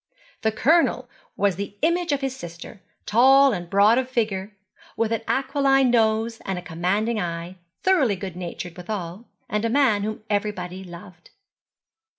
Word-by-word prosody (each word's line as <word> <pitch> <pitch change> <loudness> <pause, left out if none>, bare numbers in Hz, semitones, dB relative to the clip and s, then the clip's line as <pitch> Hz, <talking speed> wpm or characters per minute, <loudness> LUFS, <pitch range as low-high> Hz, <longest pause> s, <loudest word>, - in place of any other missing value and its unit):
The 220 - +1
Colonel 315 +10 +2 0.3
was 200 -3 +1
the 200 +1 -6
image 340 0 +1
of 285 -1 0
his 270 -1 -2
sister, 170 -1 -10 0.2
tall 270 +4 +5
and 175 -3 -5
broad 205 +5 +5
of 260 0 -3
figure, 210 -5 -2 0.4
with 225 -1 0
an 230 - 0
aquiline 270 -1 +2
nose 225 0 +1
and 190 -1 -3
a - - -4
commanding 195 +7 -1
eye, 170 0 -4 0.3
thoroughly 300 - +3
good 190 -2 -7
natured 175 -1 -7
withal, 180 +2 -6 0.2
and 210 +1 -2
a 230 - +1
man 240 -5 +3
whom 215 +1 -4
everybody 190 -3 -3
loved. 175 0 -13
210 Hz, 155 wpm, -23 LUFS, 185-255 Hz, 0.4 s, tall